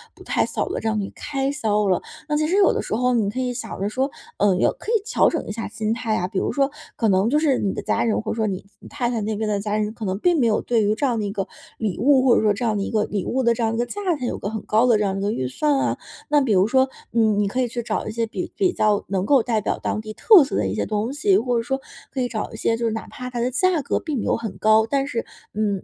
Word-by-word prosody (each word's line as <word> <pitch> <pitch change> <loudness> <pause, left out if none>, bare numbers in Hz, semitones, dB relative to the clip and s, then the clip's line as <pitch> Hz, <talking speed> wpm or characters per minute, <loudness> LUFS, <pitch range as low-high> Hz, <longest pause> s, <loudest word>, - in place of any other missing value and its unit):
不 - - -14
太 - - +1
小 - - -3
的 - - -2
这 - - -3
样 220 -1 +1
一 195 - -3
个 - - -17
开 275 -1 -2
销 215 -7 0
了。 180 - +2 0.3
那 300 - +1
其 305 0 +1
实 355 - +1
有 400 -1 +5
的 - - -1
时 - - -3
候 250 +2 +2
你 220 -4 +1
可 255 +5 -3
以 250 -1 -1
想 235 - -6
着 200 - 0
说， 260 +5 -1 0.3
呃， 200 -2 +3
有 180 - +3
可 - - -10
以 445 - +3
调 455 +3 +3
整 325 - -3
一 - - -4
下 225 +2 -4
心 215 +1 -2
态 225 -2 -1
啊， 180 - -1
比 190 - -1
如 - - -1
说， 280 -1 +1 0.2
可 225 - +1
能 195 +3 +3
就 295 - +3
是 290 -5 +2
你 195 - 0
的 - - -4
家 - - 0
人， 225 - +1
或 220 - -4
者 - - -2
说 220 -1 +1
你 190 -2 -3 0.2
你 - - -13
太 255 -4 -2
太 240 -2 -1
那 215 +1 -2
边 215 +1 -2
的 205 -1 0
家 205 +1 -2
人， 215 0 -1
可 225 -2 -6
能 190 0 -1
并 345 +5 +3
没 240 - +3
有 215 - +2
对 230 -3 +1
于 210 +1 +2
这 285 - -1
样 240 -4 +1
的 210 - -1
一 200 - -3
个 195 -3 -3 0.3
礼 210 -6 -2
物， 270 0 +5
或 255 -3 +5
者 - - +3
说 210 -1 +3
这 205 - -5
样 220 -3 +1
的 200 - -1
一 - - -3
个 215 -2 +1
礼 205 -3 -3
物 260 +1 0
的 235 -1 +4
这 230 - -4
样 225 -1 +1
的 - - -2
一 - - -2
个 240 - +1
价 410 +12 -6 0.2
钱 255 - -4
有 - - -3
个 - - -4
很 220 0 -4
高 220 +4 +3
的 235 -3 +5
这 210 - 0
样 195 -1 -1
一 - - -3
个 205 +2 0
预 130 - -2
算 290 - +1
啊。 - - 0 0.3
那 295 - +5
比 265 -6 +1
如 190 +1 +4
说， 260 +2 +3 0.2
嗯， 220 -3 +2
你 200 - 0
可 250 - -2
以 250 - +1
去 240 0 -4
找 220 -1 -2
一 - - -3
些 230 0 0
比 225 - -5
比 375 -3 +2
较 210 - +1
能 190 -1 0
够 270 0 +4
代 225 -2 0
表 210 - -1
当 - - -1
地 215 0 -7
特 375 - +7
色 - - -4
的 100 - +1
一 - - -2
些 105 0 -1
东 215 +3 -1
西， 355 +8 +3
或 245 -9 0
者 - - -2
说 270 +3 -2 0.3
可 265 - -1
以 245 - -1
找 220 -3 -4
一 - - -7
些 225 - 0
就 235 - -2
是 225 - 0
哪 225 - -5
怕 250 0 -7
它 240 -1 -3
的 245 +2 0
价 345 +4 +2
格 - - -1
并 305 -4 -3
没 225 - -2
有 - - +1
很 225 -3 -6
高， 220 +1 +4
但 275 +1 +1
是， 240 -5 -3 0.3
嗯， 205 -2 -1
225 Hz, 360 characters per minute, -22 LUFS, 210-260 Hz, 0.3 s, 特